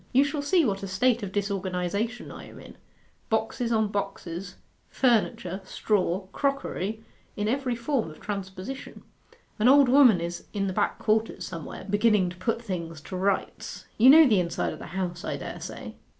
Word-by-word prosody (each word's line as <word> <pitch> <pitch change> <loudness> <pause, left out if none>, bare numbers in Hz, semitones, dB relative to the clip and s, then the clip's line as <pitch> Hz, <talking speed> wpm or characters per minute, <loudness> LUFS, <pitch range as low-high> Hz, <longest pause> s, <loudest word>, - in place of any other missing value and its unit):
'You 265 +3 +6
shall 290 +1 -2
see 325 +3 +3
what 195 -4 -1
a 195 - -4
state 235 +6 +2
of 200 -2 -5
disorganization 200 +3 -2
I - - -9
am - - -13
in - - -12 0.5
boxes 225 +2 -1
on 220 -2 +2
boxes, 185 -3 -4 0.3
furniture, 225 -6 +1
straw, 190 -2 0
crockery, 220 -7 -2 0.3
in 210 0 -1
every 255 +1 0
form 235 - -1
of 155 - -13
transposition. 195 +5 -6 0.6
An 215 - +4
old 275 0 +7
woman 250 -8 +7
is 170 +1 -5
in 200 -2 -1
the 190 - -2
back - - 0
quarters 220 +1 0
somewhere, 165 -3 -7
beginning 205 -3 +3
to 180 - -11
put 230 +5 -2
things 170 -6 -5
to 185 - -8
rights.... 190 +1 -2
You 245 +4 +8
know 315 +3 +9
the 215 -6 +4
inside 170 -1 -1
of - - -10
the - - -8
house, 180 -1 -4
I - - -3
dare - - -7
say? - - -7
205 Hz, 175 wpm, -27 LUFS, 185-240 Hz, 0.6 s, know